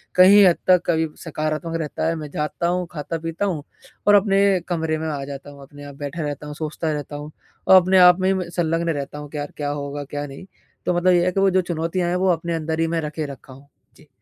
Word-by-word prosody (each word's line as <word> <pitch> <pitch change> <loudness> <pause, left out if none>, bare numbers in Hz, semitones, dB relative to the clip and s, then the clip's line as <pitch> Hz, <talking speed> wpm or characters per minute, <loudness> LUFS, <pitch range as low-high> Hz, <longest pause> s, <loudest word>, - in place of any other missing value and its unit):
कहीं 195 +2 +8
हद 175 -2 +4
तक 180 -1 +6
कभी 160 -1 +1 0.2
सकारात्मक 155 0 -3
रहता 155 +1 -3
है। 165 - 0
मैं 150 -2 -6
जाता 150 +3 -2
हूँ 180 0 0
खाता-पीता 165 +3 -4
हूँ 170 -7 -2 0.4
और 205 - +7
अपने 195 -1 +3 0.3
कमरे 160 -2 -1
में 160 - -4
आ 140 -2 -3
जाता 140 0 -8
हूँ 140 -1 -14
अपने 145 +1 -13
आप 140 - -10
बैठा 145 +3 -5
रहता 145 0 -5
हूँ, 150 - -7
सोचता 155 +1 -3
रहता 145 0 -5
हूँ 150 +1 -8 0.4
और 190 -1 +8
अपने 185 +1 +3
आप 180 0 +7
में 185 - +2
ही - - +3
म 175 -2 -5
संलग्न 170 -1 -1
रहता 145 -2 -3
हूँ 145 -1 -9
कि 150 - -7
यार 145 0 -5
क्या 145 -1 -2
होगा 145 0 -4
क्या 145 +1 -5
नहीं? 140 +6 -10 0.4
तो 180 - +1
मतलब 180 +1 +4
ये 175 0 +3
है 180 - +2
कि 195 - -1
वो 195 0 +4
जो 185 - +4
चुनौतियाँ 175 +1 -2
हैं 180 - 0
वो 185 +1 +1
अपने 170 0 -3
अंदर 160 0 -3
ही 165 - +2
मैं 165 - 0
रखे 150 0 -4
रखा 135 -2 -10
हूँ। 135 +2 -16 0.3
जी। 155 - -20
160 Hz, 255 wpm, -22 LUFS, 145-175 Hz, 0.4 s, कहीं